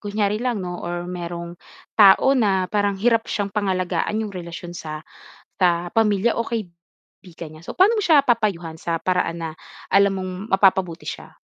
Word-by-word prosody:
kunyari 205 +1 -1
lang 240 -5 -1
'no 180 0 -5
or 175 0 -4
merong 170 -1 -6 0.4
tao 205 +6 +7
na 195 -6 +2
parang 205 -2 +1
hirap 230 +1 +2
siyang 200 -1 -2
pangalagaan 190 0 -1
yung 205 - -7
relasyon 170 0 -7
sa, 155 -2 -7 0.6
ah, 175 0 +2
pamilya 220 0 +2
o 230 - 0
kaibigan 170 -4 -9
niya, 155 - -14
so, - - -5
paano 415 +5 +5
mo - - 0
siya 310 -5 +6
papayuhan 200 - 0
sa 165 -1 -2
paraan 180 -2 -1
na 165 - -4 0.4
alam 200 0 +5
mong 185 0 -4 0.2
mapapabuti 190 -3 +2
siya? - - -7
190 Hz, 165 wpm, -22 LUFS, 175-210 Hz, 0.6 s, tao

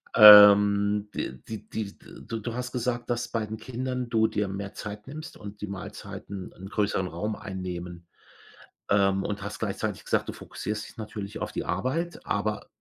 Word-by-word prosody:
Ähm, 105 -1 +9
d 65 - -4
die 110 -1 -7
die 105 -3 -5 0.3
du 115 - -3
du 115 +2 -4
hast 125 0 -4
gesagt, 120 -1 -2
dass 120 -1 -1
bei 110 -2 -2
den 110 +1 -5
Kindern 125 0 -4
du 110 -1 +3
dir 105 -1 -1
mehr 100 +1 -5
Zeit 105 0 -7
nimmst 155 +3 -8
und 105 0 -10
die 105 - -3
Mahlzeiten 100 0 -7
'n 95 +1 -10
größeren 100 -3 0
Raum 105 +6 -3
einnehmen, 90 -3 -6 0.8
ähm, 95 -1 +3
und 105 -1 -3
hast 100 +1 -6
gleichzeitig - - -3
gesagt, - - 0
du - - -4
fokussierst 105 0 -5
dich - - -16
natürlich 105 -1 -6
auf - - -3
die - - -4
Arbeit, 130 - -2
aber 105 +1 -1
105 Hz, 175 wpm, -27 LUFS, 100-115 Hz, 0.8 s, Ähm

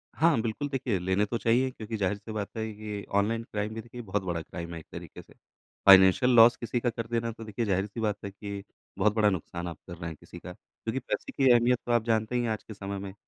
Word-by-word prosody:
हाँ। 160 0 +4
बिल्कुल 115 +6 -2
देखिए, 125 -8 -1
लेने 95 +3 +1
तो 115 +3 -2
चाहिए 120 +5 +2
क्योंकि 110 -1 -6
ज़ाहिर 100 0 0
सी 110 +2 -10
बात 105 -2 -3
है 110 0 -2
कि 105 -1 -6
ऑनलाइन 115 +3 +1
क्राइम 105 -1 -4
भी 115 - -5
देखिए 120 +1 -9
बहुत 105 -2 -2
बड़ा 85 -3 -2
क्राइम 85 +1 -7
है 85 - -5
एक 80 - -14
तरीके - - -9
से। - - -20 0.5
फ़ाइनेंशियल 95 +6 +8
लॉस 115 +1 +8
किसी 120 +1 -2
का 120 0 +1
कर 115 -1 -5
देना 115 0 -1
तो 115 0 -10
देखिए 110 +2 -3
ज़ाहिर-सी 100 +3 -1
बात 105 -2 0
है 100 - -5
कि, 100 0 -7 0.3
बहुत 105 - +3
बड़ा 105 -1 +4
नुकसान 85 -1 -4
आप 85 -3 -6
कर 85 - -7
रहे 85 0 -5
हैं 80 - -8
किसी - - -12
का - - -9
क्योंकि 115 +4 -6
पैसे - - -4
की 135 -2 +4
अहमियत 120 +1 +4
तो 120 - -1
आप 120 -2 +3
जानते 110 +1 +1
ही 120 - +2
हैं 115 - -1
आज 110 - -3
के 110 - -9
समय 100 0 -5
में 95 -1 -7
110 Hz, 260 wpm, -28 LUFS, 100-115 Hz, 0.5 s, फ़ाइनेंशियल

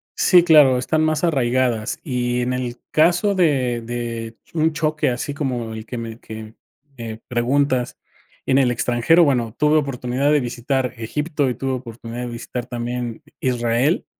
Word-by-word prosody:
sí, 180 -2 +5
claro, 150 -6 +6
están 155 +5 0
más 155 +1 0
arraigadas, 125 -7 +1
y 125 -3 -1
en 125 +1 -1
el 125 -1 -3
caso 175 +6 +3
de 130 -9 +1
de 115 -1 -5 0.2
un 160 0 +2
choque 155 -2 0
así 125 +4 -3
como 125 -6 -3
el 110 0 -7
que 120 - -6
me 115 -1 -6
que 110 -1 -8 0.5
me, 115 -2 -5
eh, 110 - -11
preguntas 125 +1 0 0.5
en 130 - +3
el 130 -3 +3
extranjero, 120 +8 +3
bueno, 125 -5 +1
tuve 150 +1 +3
oportunidad 135 0 0
de 150 - +4
visitar 125 +1 -2
Egipto 145 +4 -1
y 120 - -2
tuve 135 +2 -2
oportunidad 120 -1 -6
de 125 - -3
visitar 120 +1 -5
también 120 +1 -4 0.2
Israel 125 +2 +1
125 Hz, 160 wpm, -21 LUFS, 120-145 Hz, 0.5 s, claro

